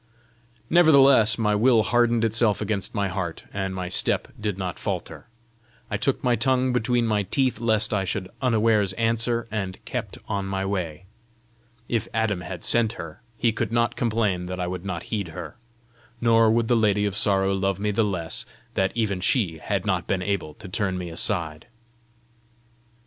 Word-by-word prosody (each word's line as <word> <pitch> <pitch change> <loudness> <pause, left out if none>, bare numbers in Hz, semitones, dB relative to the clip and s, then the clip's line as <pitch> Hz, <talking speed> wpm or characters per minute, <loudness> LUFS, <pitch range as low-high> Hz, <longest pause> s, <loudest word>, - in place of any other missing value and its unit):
Nevertheless 140 -9 +6
my 105 -2 +1
will 115 +1 +4
hardened 120 +2 +2
itself 110 -1 +2
against 105 -2 -3
my 100 -2 +1
heart, 90 -3 -4
and 95 -1 -3
my 90 -1 -3
step 90 - +1
did 105 -3 -2
not 90 -2 -4
falter. - - -5 0.6
I 105 - 0
took 135 +6 -1
my 125 -2 +3
tongue 130 +2 +1
between 120 0 +1
my 105 -2 +1
teeth 130 +6 0
lest 110 -1 +1
I 100 -2 +1
should 95 0 -3
unawares 110 -5 +2
answer, 115 +2 0
and 95 -4 -3
kept - - -4
on 100 -1 -2
my 95 0 -2
way. 90 -3 -3 0.8
If 115 -2 -1
Adam 110 -5 0
had 90 -1 -7
sent 115 -2 +2
her, 85 -5 -9 0.2
he 115 +1 +2
could 115 0 -3
not 115 0 +1
complain 105 -6 0
that 90 0 -5
I 90 - -1
would 90 +1 -5
not 95 - -4
heed 100 -4 -1
her! 80 - -8 0.6
Nor 115 -1 +4
would 115 +1 +2
the 120 - +3
Lady 105 -2 +2
of 100 -2 -2
Sorrow 95 -1 +2
love 95 -1 0
me 105 +1 0
the 110 +2 +2
less 90 -6 -2 0.3
that 95 0 +1
even 100 -5 -1
she 90 -6 +1
had 100 +2 -2
not 95 -5 0
been 95 -2 0
able 90 -6 -2
to 105 - -10
turn 95 0 -1
me 90 -1 -5
aside! 80 -3 -1
105 Hz, 175 wpm, -24 LUFS, 95-115 Hz, 0.8 s, Nevertheless